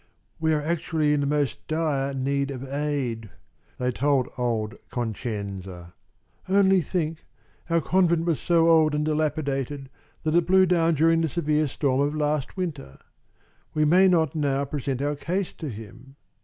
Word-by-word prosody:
"We 160 0 +1
are 150 - 0
actually 155 -2 0
in 145 - +1
the 140 - 0
most 145 -3 -1
dire 150 -4 0
need 140 +1 -1
of 135 -1 -6
aid," 135 -6 -2 0.5
they 125 0 0
told 135 0 +1
old 115 -3 -1 0.2
Concenza. 100 -7 -5 0.6
"Only 190 -1 +4
think! 160 0 -3 0.5
our 165 0 +2
convent 170 0 +2
was 165 -4 0
so 165 -1 +3
old 160 -2 +4
and 150 0 0
dilapidated 145 -3 -2 0.3
that 155 -1 0
it 170 0 +3
blew 190 +1 +5
down 170 -2 +2
during 165 +2 +3
the 160 - 0
severe 155 -1 0
storm 135 0 0
of 145 +2 0
last 150 +1 -1
winter. 150 - -5 0.8
We 155 0 +3
may 180 +5 +5
not 165 -5 +2
now 140 -2 0
present 140 -1 -3
our 145 +1 0
case 180 +6 -3
to 155 - -6
him. 115 +4 -11
150 Hz, 155 wpm, -25 LUFS, 135-165 Hz, 0.8 s, blew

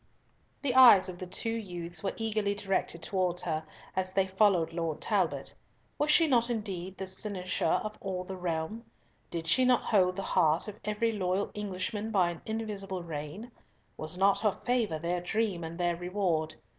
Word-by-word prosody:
The 265 -3 +1
eyes 235 -8 +8
of 180 -1 -8
the 185 - -6
two 225 +5 -2
youths 175 -6 -2
were 195 - -2
eagerly 215 -2 0
directed 195 -4 -1
towards 180 -2 0
her, 160 -2 -2 0.3
as 185 0 -1
they 195 -1 +3
followed 190 -4 +3
Lord 165 -2 -2
Talbot. - - 0 0.5
Was 295 - +1
she 325 +2 +6
not 245 -5 +3
indeed 190 -5 -4
the 190 - -4
cynosure 185 -3 -1
of 215 0 -6
all 185 -2 -3
the 190 +1 -6
realm? 175 +5 -3 0.5
Did 165 -1 -4
she 255 +11 +4
not 250 -1 +4
hold 185 -4 +3
the 195 - -3
heart 160 +1 +2
of 210 0 -8
every 210 +2 0
loyal 190 -1 -1
Englishman 205 +1 -3
by 185 -5 +2
an 170 - -9
invisible 205 -4 -3
rein? 165 +8 -6 0.4
Was 155 +3 -4
not 195 +1 +4
her 210 -3 +1
favour 235 -9 +1
their 175 +2 -1
dream 200 -1 -1
and 165 +1 -6
their 175 -1 +1
reward? 175 -3 -1
190 Hz, 175 wpm, -30 LUFS, 175-215 Hz, 0.5 s, eyes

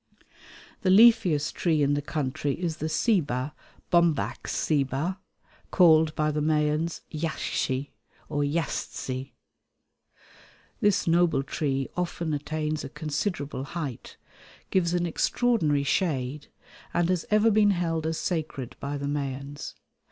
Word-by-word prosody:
The 185 - +1
leafiest 185 -8 +5
tree 160 -4 +1
in 140 +1 +2
the 145 - 0
country 145 -1 -2
is 170 -3 -2
the 155 - -3
ceiba 150 - +1 0.4
(Bombax 170 -4 +2
ceiba), 150 +5 0 0.5
called 160 -3 +5
by 155 0 +1
the 150 0 -1
Mayans 155 +2 0
yaxche 145 -3 -2 0.4
or 145 -1 -1
yastse. 140 -3 -2 1.5
This 205 -2 +2
noble 170 -4 +3
tree 135 -2 -1
often 170 -2 -2
attains 155 +1 -2
a 135 - -6
considerable 145 -2 -3
height, 140 -4 -6 0.5
gives 175 -2 +2
an 175 0 +1
extraordinary 170 - +1
shade, 140 -3 -1 0.5
and 175 -1 +3
has 180 -3 0
ever 215 +1 +4
been 210 0 +4
held 165 -4 0
as 160 0 -1
sacred 155 -7 -3
by 145 +1 -3
the 140 - -4
Mayans. 140 0 -4
155 Hz, 120 wpm, -27 LUFS, 145-175 Hz, 1.5 s, leafiest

